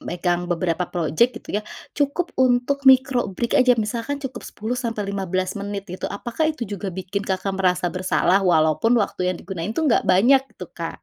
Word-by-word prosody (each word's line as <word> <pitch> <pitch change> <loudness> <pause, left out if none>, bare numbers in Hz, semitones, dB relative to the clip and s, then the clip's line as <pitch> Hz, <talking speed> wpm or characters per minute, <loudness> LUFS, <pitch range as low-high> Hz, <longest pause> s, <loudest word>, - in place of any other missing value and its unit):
megang 175 0 -2
beberapa 175 0 -1
projek 175 +9 +1
gitu 205 - -3
ya, - - -7 0.3
cukup 290 +5 -1
untuk 260 +2 +2
micro 260 -1 +5
break 235 +7 0
aja, 255 -1 +5
misalkan 235 +6 -3
cukup 270 -2 -6
10 220 +4 -4
sampai 230 -5 -3
15 190 0 -2
menit, 200 -1 -5
gitu, 185 - -4
apakah 240 +9 -2
itu 280 - -7
juga 205 -3 -5
bikin 190 +2 -4
kakak 190 +1 -1
merasa 180 -2 +1
bersalah, 185 0 +2
walaupun 160 +7 +3
waktu 205 -5 0
yang - - -7
digunakan 175 -4 -5
itu 325 - -1
enggak 280 -7 +2
banyak, 235 +9 +5
gitu, - - -10
Kak? - - -7
200 Hz, 180 wpm, -22 LUFS, 185-250 Hz, 0.3 s, micro